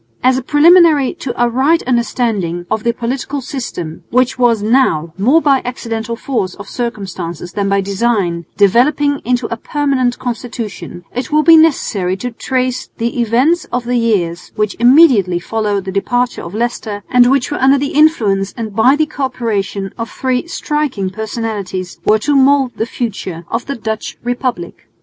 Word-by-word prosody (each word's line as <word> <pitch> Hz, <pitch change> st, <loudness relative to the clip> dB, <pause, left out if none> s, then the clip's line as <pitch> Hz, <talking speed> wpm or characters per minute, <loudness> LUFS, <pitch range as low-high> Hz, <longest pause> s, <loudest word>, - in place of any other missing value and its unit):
As 255 Hz, 0 st, +4 dB
a 260 Hz, -, -1 dB
preliminary 305 Hz, 0 st, +5 dB
to 260 Hz, -, -3 dB
a 240 Hz, -, +4 dB
right 270 Hz, +8 st, +2 dB
understanding 225 Hz, -8 st, -1 dB
of 220 Hz, -, -1 dB
the 235 Hz, -, +2 dB
political 250 Hz, +4 st, -3 dB
system, 235 Hz, -, -6 dB
which 255 Hz, +1 st, +1 dB
was 230 Hz, -4 st, +3 dB
now, 210 Hz, -, +2 dB
more 260 Hz, +12 st, +3 dB
by 275 Hz, -3 st, +3 dB
accidental 230 Hz, -2 st, -4 dB
force 230 Hz, -7 st, -3 dB
of 205 Hz, -1 st, -10 dB
circumstances 185 Hz, -8 st, -5 dB
than 200 Hz, -1 st, -1 dB
by 200 Hz, 0 st, +2 dB
design, 195 Hz, -4 st, -1 dB
developing 275 Hz, +8 st, +3 dB
into 245 Hz, 0 st, 0 dB
a -, -, -5 dB
permanent 270 Hz, -2 st, -1 dB
constitution, 230 Hz, -7 st, -6 dB
it 250 Hz, +4 st, -4 dB
will 305 Hz, 0 st, +3 dB
be 330 Hz, 0 st, +7 dB
necessary 210 Hz, -, +2 dB
to 245 Hz, +5 st, -5 dB
trace 255 Hz, +2 st, -2 dB
the 235 Hz, +1 st, -1 dB
events 255 Hz, +10 st, +2 dB
of 245 Hz, 0 st, -3 dB
the 245 Hz, +1 st, -1 dB
years 185 Hz, -7 st, -1 dB
which 210 Hz, -1 st, -1 dB
immediately 240 Hz, -, +5 dB
followed 205 Hz, +1 st, -2 dB
the 190 Hz, -, -4 dB
departure 245 Hz, +5 st, -1 dB
of 170 Hz, +4 st, -8 dB
Leicester, 220 Hz, -3 st, -3 dB
and 245 Hz, 0 st, +5 dB
which 270 Hz, 0 st, +1 dB
under 275 Hz, -1 st, +3 dB
the 280 Hz, +1 st, -2 dB
influence 215 Hz, -11 st, +2 dB
and 220 Hz, -3 st, -5 dB
by 245 Hz, +5 st, +5 dB
the 310 Hz, +1 st, +1 dB
co 285 Hz, -3 st, -3 dB
operation 205 Hz, -6 st, -3 dB
of 230 Hz, -, -4 dB
three 260 Hz, +4 st, -2 dB
striking 295 Hz, -, -2 dB
personalities 210 Hz, -4 st, -5 dB
were 215 Hz, -, +4 dB
to 285 Hz, +7 st, 0 dB
mould 270 Hz, -1 st, +4 dB
the 225 Hz, -, -2 dB
future 190 Hz, -9 st, -5 dB
of 230 Hz, +1 st, -3 dB
the 280 Hz, -, -3 dB
Dutch 220 Hz, -1 st, -5 dB
republic. 245 Hz, -, -4 dB
235 Hz, 165 wpm, -15 LUFS, 200-265 Hz, -, be